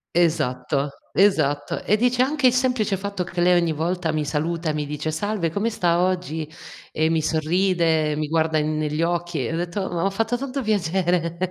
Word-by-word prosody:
Esatto. 140 -4 +1 0.2
Esatto. 155 -8 +2
E 210 - +2
dice: 245 +2 +2
"Anche 280 0 +3
il 245 - +4
semplice 250 -5 +1
fatto 200 -1 -3
che 175 0 -4
lei 180 0 +5
ogni 170 -2 +1
volta 165 +1 -1
mi 155 -1 -1
saluta 160 +3 -2
e - - 0
mi 150 -1 -2
dice 150 +2 -3
'salve 195 0 -1
come 205 +6 0
sta 175 -5 +1
oggi' 180 -4 -1 0.4
e 160 +1 +1
mi 160 -1 +1
sorride, 160 -1 +1
mi 155 0 -2
guarda 160 0 +1
negli 155 0 -1
occhi," 170 -5 -1
e - - -3
ho 165 - -1
detto: 180 +3 -3
"M'ha 175 +3 0
fatto 225 +4 -1
tanto 275 +1 -4
piacere." 175 -4 0
170 Hz, 185 wpm, -23 LUFS, 155-195 Hz, 0.4 s, lei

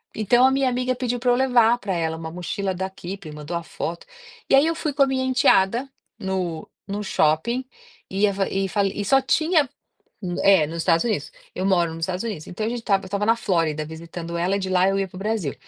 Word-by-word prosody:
Então, 240 +4 +4
a 265 - +5
minha 270 -1 +2
amiga 250 0 -1
pediu 245 -1 -2
pra 245 0 +2
eu - - +4
levar 245 -2 +4
pra 200 -4 -3
ela 160 -1 -1
uma 160 0 -6
mochila 185 +2 -3
da 190 +1 -3
Kipping, 190 -3 -8
mandou 150 +3 -6
a 170 - -6
foto. 170 +1 -5 0.4
E, - - +6
aí, 275 +3 +6
eu 330 - 0
fui 305 -3 -2
com 280 -1 +4
a - - +2
minha 260 -1 0
enteada, 250 -1 +3 0.3
no 180 -4 -3 0.2
no 205 +1 -3
shopping 205 +10 +1 0.4
e 195 +2 +2
a 200 - +1
fa 195 0 0
e 195 0 -1
fa 200 +3 0
e 200 +1 -2
só 270 +7 +4
tinha 310 +2 +2 0.7
É, 190 -6 +5
nos 165 +2 -6
Estados 165 +4 +2
Unidos, 205 -11 -1 0.2
eu 185 - -3
moro 175 -4 +2
nos 165 - -7
Estados 185 +5 -2
Unidos, 200 -9 -5
então, 215 +4 -3
a - - 0
gente 240 0 -3
estava 195 -4 +1
estava 200 +2 -1
na 230 - +4
Flórida 165 -8 0
visitando 165 +2 -7
ela, 180 +3 +1
e - - -1
de 190 -1 -3
lá 185 +1 +3
eu 195 0 +1
ia 195 - 0
para - - -28
o - - -6
Brasil 205 -8 -2
195 Hz, 235 wpm, -23 LUFS, 170-245 Hz, 0.7 s, E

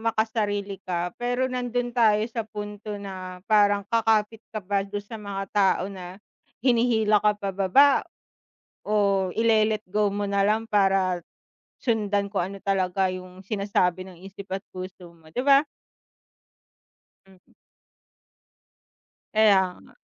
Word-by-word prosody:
makasarili 215 -3 -1
ka 175 -1 -3
pero 245 +1 0
nandun 245 -1 -2
tayo 215 -3 +3
sa 230 0 -4
punto 210 -1 -6
na 185 -2 -8
parang 205 -2 +3
kakapit 225 0 +1
ka 215 -4 -6
pa 200 +1 +1
dun 200 +1 -5
sa 220 +1 -9
mga 195 -1 -4
tao 195 -3 +3
na 180 -1 -9 0.5
hinihila 230 -4 +3
ka 210 -1 +2
pa 200 -1 -4
baba. 195 +9 +5 1.0
O 200 -3 +2
ile 220 -1 +3
let 210 - -21
go 205 +2 +1
mo 205 +1 -2
nalang 200 +2 +1
para 195 -4 +2 0.6
sundan 205 -4 0
kung 195 -4 -1
ano 195 - -10
talaga 190 -1 +1
yung 185 0 -8
sinasabi 195 -2 0
ng 180 -2 -14
isip 195 +1 -10
at 195 - -3
puso 185 -1 -9
mo, 160 -2 -20
'di 250 - -1
ba? 280 +2 +5 1.6
Mm. 190 -2 -23 1.8
Kaya 195 -4 +4
nga. - - -19
205 Hz, 130 wpm, -25 LUFS, 190-220 Hz, 1.8 s, baba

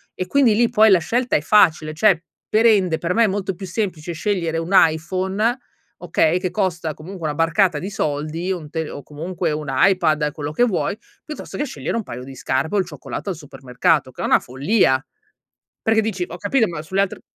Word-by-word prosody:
e 185 - -3
quindi 255 -2 +3
lì, 235 +1 +3
poi 220 -2 +5
la 190 - +7
scelta 245 +9 0
è - - -3
facile. 155 -4 +3
Cioè, 170 0 +3 0.3
per 220 +2 +3
ende, 190 -8 +4
per 175 +1 -1
me, 230 +2 +4
è - - +2
molto 195 -1 -2
più 190 +2 -8
semplice 180 -4 -3
scegliere 170 -2 -1
un 165 +3 -5
iPhone, 190 +8 +2 0.4
okay, 170 0 +2
che 185 -1 -2
costa 175 -6 -1
comunque 175 +2 -10
una 150 - -3
barcata 165 +1 +2
di 185 - -5
soldi, 155 0 -2
o 185 - -1
un 150 - -11
te 160 -2 -3
o 145 - -8
comunque 170 +3 -4
un 150 0 -4
iPad, 155 0 +2
quello 150 -2 -5
che 155 - +2
vuoi, 210 -1 -1 0.3
piuttosto 305 - -7
che 295 - -1
scegliere - - -4
un 225 - -2
paio 125 -7 -8
di 135 +1 -10
scarpe 135 +7 -1
o - - +3
il 190 - +1
cioccolato - - -7
al 185 - -2
supermercato, 135 0 -1
che - - -9
è - - -1
una - - +4
follia, 135 - +1 0.8
perché 225 0 +3
dici: 205 -5 -2
"Ho 175 - -8
capito, 220 +4 +1
ma 165 -3 -5
sulle 190 +5 -1
altre" 200 - -2
175 Hz, 210 wpm, -21 LUFS, 155-200 Hz, 0.8 s, la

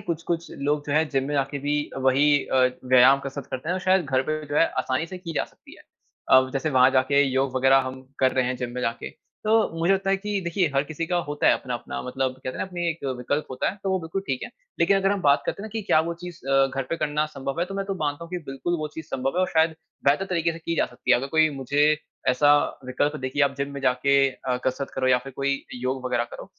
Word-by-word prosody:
कुछ-कुछ 170 0 -3
लोग 145 +1 -1
जो 145 - -2
है, 155 +2 +3
जिम 135 -2 0
में 145 - -2
जाके 140 +1 -1
भी 145 +2 0 0.2
वही 135 +2 +4
अ, 130 -1 +3 0.2
व्यायाम 130 +2 +6
कसरत 140 0 -6
करते 130 +4 -5
हैं। 180 - +1
और 185 - -3
शायद 185 -1 +3
घर 130 -2 +1
पे 155 +2 -3
जो 145 - -3
है, 165 - +5
आसानी 130 +5 -1
से 185 +2 -8
की 170 -2 -7
जा - - +1
सकती - - -17
है। - - -17 0.5
अ, 130 0 +6
जैसे 145 +3 -1
वहाँ 130 0 +5
जाके 135 +2 +3
योग 135 0 0
वग़ैरह 135 +1 +5
हम 130 0 -7 0.2
कर 130 -1 +3
रहे 130 - +1
हैं, 130 - -1
जिम 125 -1 -4
में 125 - -3
जाके, 115 -1 -3 0.3
तो 215 -6 +2
मुझे 170 +4 +3
लगता 195 0 0
है 195 - +3
कि 205 0 -3
देखिए 175 0 0
हर 135 - +3
किसी 155 +2 -4
का 175 +1 0
होता 145 0 -1
है, - - +7
अपना-अपना 125 -2 -5
मतलब 130 0 -2
कहते 130 0 -8
है - - -5
ना, - - -2
अपने 175 -2 -3
एक 165 -2 -7
विकल्प 145 +5 -2
होता 130 - -1
है, 195 - -10
तो 195 - -1
वो 190 - +1
बिल्कुल 165 +4 -4
ठीक 130 -2 -2
है। - - -6 0.3
लेकिन 195 +4 +4
अगर 195 0 +2
हम 200 - -2
बात 140 0 +4
करते 200 - -3
हैं - - -5
ना, - - -8
कि 220 -1 -3
क्या 155 - +3
वो 170 +1 -3
चीज़ 175 -1 -8
अ, 135 0 +4
घर 135 - -1
पे 165 - 0
करना 150 0 0
संभव 140 +1 -5
है। 175 - +1
तो 195 - -7
मैं 195 0 -2
तो 195 - -2
मानता 145 +3 -2
हूँ, 170 - -13
कि 180 - -3
बिल्कुल 175 +6 -2
वो 155 0 -3
चीज़ 160 - -7
संभव 135 +5 -2
है। - - +3
और 185 - +1
शायद 160 0 +3 0.3
बेहतर 145 +7 +3
तरीक़े 170 -3 0
से 165 - -8
की 165 0 -3
जा - - +2
सकती 125 - -5
है, - - +7
अगर 130 +3 -3
कोई 155 0 +5
मुझे 145 +3 +2 0.3
ऐसा 130 +3 +4 0.4
विकल्प 145 +4 0
देखिए 130 +3 -1
आप 140 -1 +2
जिम 140 0 -3
में 140 - -6
जाके 135 +1 +2 0.2
अ, 130 -1 -3
कसरत 135 +1 -2
करो 130 -1 -1
या 125 - +5
फ़िर 135 +2 -10
कोई 140 0 -1 0.2
योग 130 0 -2
वग़ैरह 120 -1 0
करो, - - -8
145 Hz, 275 wpm, -25 LUFS, 130-165 Hz, 0.5 s, है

